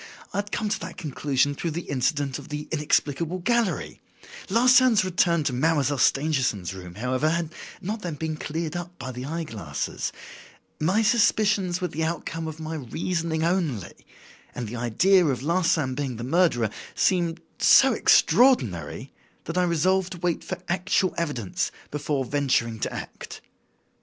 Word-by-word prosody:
I - - 0
had 205 +1 -4
come 215 - -1
to 210 - -1
that - - -8
conclusion 145 -1 0
through 165 +4 -3
the 165 +2 -3
incident 140 +1 -1
of 140 - -12
the 150 0 -5
'inexplicable 155 +2 0
gallery.' 230 +2 -1 0.5
Larsan's 240 -1 +5
return 170 -3 +2
to 135 - -1
Mademoiselle 145 0 +1
Stangerson's 130 - +1
room, 90 -2 -10
however, 130 +7 0
had 165 0 -1 0.3
not 210 +4 -4
then 175 -5 -4
been 155 +1 -3
cleared 160 +2 -4
up 175 0 -6
by 130 - -6
the 125 +1 -6
eye 165 +4 -3
glasses. 95 - -4 0.7
My 185 +8 +2
suspicions 210 -5 +2
were 180 - 0
the 160 - -3
outcome 165 0 -3
of 160 0 -7
my 160 0 -5
reasoning 160 +3 -2
only; 165 - -1 0.6
and 120 -2 -4
the 115 - -6
idea 175 - +3
of 135 -5 0
Larsan 165 -4 +1
being 135 -2 -3
the 115 - -5
murderer 130 - +2 0.2
seemed 170 -3 +1 0.2
so - - +6
extraordinary 125 - +3 0.3
that 165 - -5
I - - +3
resolved 180 +2 +1
to - - -8
wait 175 -1 -1
for - - -4
actual 185 +1 +1
evidence 125 - -2 0.2
before 145 -2 -1
venturing 125 -5 0
to - - -2
act. - - -8
160 Hz, 155 wpm, -25 LUFS, 130-180 Hz, 0.7 s, so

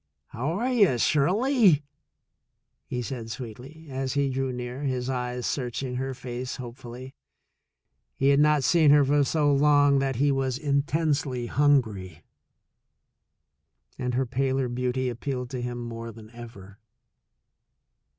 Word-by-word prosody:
''How 150 +9 -2
are 250 +4 0
you, 200 - +4
Shirley?'* 185 - +3 1.0
he 125 - -3
asked 120 -2 -6
sweetly, 130 +6 -9
as 130 0 -2
he 140 -1 +1
drew 135 0 -1
near, 125 +2 -6
his 130 -2 -2
eyes 125 -1 -3
searching 125 -1 -3
her 130 0 -3
face 125 0 -5
hopefully. 125 +1 -9 1.0
He 135 - +2
had 140 0 +4
not 150 -1 +4
seen 160 -1 +4
her 145 -1 +6
for 145 +1 +3
so 145 +1 +2
long 145 0 +4
that 135 -1 -1
he 140 +4 +2
was 135 -2 -1
intensely 140 -3 0
hungry, 110 - +1 1.8
and 125 -1 -2
her 130 +1 +1
paler 130 +1 0
beauty 125 +1 -1
appealed 125 +1 -4
to 130 -2 -4
him 120 0 -4
more 115 -1 -6
than 110 0 -14
ever. 115 -5 -12
130 Hz, 130 wpm, -26 LUFS, 125-145 Hz, 1.8 s, her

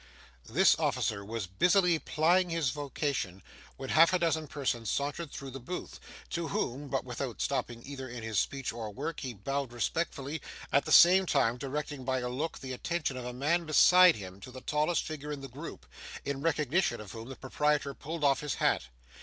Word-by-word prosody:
This - - +5
officer 100 -2 0
was 110 0 -4
busily 175 - +3
plying 175 +5 +2
his 165 -6 0
vocation 140 - -3 0.3
when 135 - -6
half 165 +3 +6
a - - +5
dozen 160 -3 0
persons 125 -6 -2
sauntered 145 +3 -2
through 135 -2 -7
the 135 - -7
booth, 135 +9 -6 0.3
to 170 -1 -2
whom, 145 - -2
but - - -2
without - - -5
stopping 120 -1 -2
either 135 -2 -7
in 120 -1 -7
his 110 -4 0
speech 135 +2 -2
or 115 -2 -5
work, 150 +10 -5
he 130 -4 -5
bowed 135 +6 -3
respectfully; 140 +3 -2 0.3
at 140 - +3
the - - -4
same 185 +2 +8
time 125 -6 +2
directing, 140 +1 -4
by 130 0 0
a 125 -1 -2
look, 150 +6 -3
the 130 -1 -6
attention 155 +1 -2
of 125 -1 -5
a 125 - -4
man 150 +7 0
beside 180 +3 +7
him 95 -2 -9
to 100 - -10
the 130 0 -10
tallest 150 +5 +1
figure 150 -1 -6
in 145 -2 -5
the 135 - -6
group, 130 - -9 0.4
in 140 -1 -3
recognition 160 +3 +1
of 105 -3 -9
whom 115 +2 -8
the 135 - -7
proprietor 145 +2 0
pulled 155 +3 -6
off 140 -1 +4
his 150 -2 -2
hat. - - +1
140 Hz, 195 wpm, -31 LUFS, 125-160 Hz, 0.4 s, same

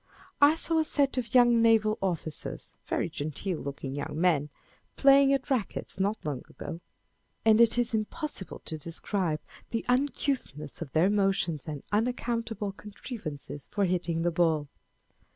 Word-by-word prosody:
I 290 +2 +7
saw 330 0 +1
a - - +3
set 280 -3 +2
of 245 +1 -5
young 240 -2 +6
naval 220 -2 +4
officers, 165 -5 -4
very - - 0
genteel 155 +4 -4
looking 140 -1 -5
young 145 +2 -4
men, 160 -5 +2 0.5
playing 275 0 +6
at 275 0 0
rackets 225 -6 -2
not 200 +3 +1
long 140 -4 -2
ago, 165 +1 -7 0.6
and 220 0 +6
it 235 0 +6
is 240 0 0
impossible 220 - -3
to 155 - -4
describe 165 +1 -2 0.3
the 230 - -3
uncouthness 250 - -1
of 150 -5 -5
their 175 +5 +4
motions 195 -7 0
and 150 -3 -5
unaccountable 230 -2 -1
contri 210 +3 -9
vances 145 -2 -7
for 200 -1 +1
hitting 175 -2 -1
the 175 - +2
ball. 160 -4 +1
200 Hz, 150 wpm, -29 LUFS, 160-240 Hz, 0.6 s, I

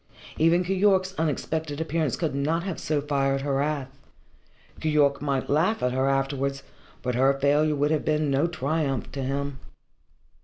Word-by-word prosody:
Even 165 +3 +4
Keyork's 190 0 +2
unexpected 160 -1 -2
appearance 160 -3 -1
could 160 -5 -2
not 155 +5 0
have 190 -3 -4
so 150 -2 -1
fired 135 -1 0
her 140 -1 0
wrath. 140 -2 -2 0.8
Keyork 150 -3 +2
might 140 -2 0
have - - -13
laughed 170 - +2
at 125 - +2
her 130 +2 +1
afterwards, 135 0 -1 0.4
but 125 - -1
her 135 +3 +3
failure 150 +2 +3
would 145 +1 +1
have 155 - +1
been 150 -2 +1
no 140 +5 +2
triumph 145 -4 -2
to 140 - -5
him. 140 +1 -3
145 Hz, 160 wpm, -26 LUFS, 135-160 Hz, 0.8 s, Even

